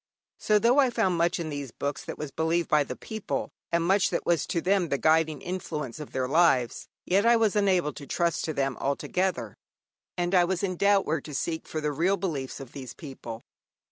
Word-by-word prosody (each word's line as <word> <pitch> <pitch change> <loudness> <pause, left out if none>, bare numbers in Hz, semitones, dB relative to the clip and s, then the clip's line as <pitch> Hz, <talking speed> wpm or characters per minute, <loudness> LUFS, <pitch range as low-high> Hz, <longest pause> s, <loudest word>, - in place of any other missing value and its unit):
So 215 - +3
though 235 +6 +4
I 265 -2 +5
found 190 -6 +1
much 170 +1 +2
in 160 -2 -3
these 145 -2 -4
books 140 +5 -4
that - - -6
was 150 -2 -5
believed 165 +3 0
by 150 -1 +4
the - - -6
people, 220 -2 -4 0.2
and 170 0 +2
much 190 +3 +3
that - - -2
was 170 -4 +1
to 170 - 0
them 185 -1 +1
the 140 - +1
guiding 155 -1 +2
influence 155 -8 -4
of 150 - -8
their 130 -1 -1
lives, 135 -5 +2 0.2
yet 195 +3 +3
I 235 +1 +6
was 220 -3 +2
unable 185 -7 +2
to 140 - -10
trust 170 +3 0
to 155 - -2
them 135 -2 -1
altogether, 180 +7 -1 0.6
and 175 +1 -1
I 180 -2 +6
was 180 +1 -1
in 185 -2 -1
doubt 200 +1 +3
where 155 0 0
to 150 0 -8
seek 160 +2 -3
for 155 - -3
the 150 0 0
real 175 +7 +1
beliefs 145 -10 -3
of 135 -3 -9
these 130 -3 -8
people. 120 -6 -8
165 Hz, 215 wpm, -27 LUFS, 145-190 Hz, 0.6 s, I